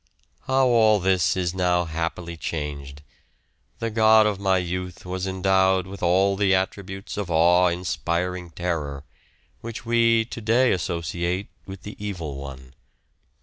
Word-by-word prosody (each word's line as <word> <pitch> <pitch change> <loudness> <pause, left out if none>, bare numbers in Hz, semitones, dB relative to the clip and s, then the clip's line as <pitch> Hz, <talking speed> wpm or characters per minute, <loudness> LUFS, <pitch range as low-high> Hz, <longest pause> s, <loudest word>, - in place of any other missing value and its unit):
How 130 0 +3
all 110 -4 +4
this 95 -1 +2
is 90 -2 -1
now 90 -1 +1
happily 85 +1 -4
changed! 75 -3 -5 0.7
The 115 0 -3
God 110 0 +5
of 105 -2 0
my 95 -1 +2
youth 90 0 -4
was 90 +1 -3
endowed 95 0 +2
with 95 +1 -10
all 95 +3 +3
the 95 -1 +3
attributes 95 +1 -4
of 100 -3 -3
awe 85 +2 +4
inspiring 90 0 -2
terror, 80 -5 -3 0.6
which 115 +1 -8
we 115 -1 +3
to 120 - -8
day 120 +4 +3
associate 85 +2 -2 0.2
with 95 -1 -9
the 105 - -8
evil 85 -9 -5
one. 65 -2 -9
90 Hz, 140 wpm, -24 LUFS, 85-100 Hz, 0.7 s, God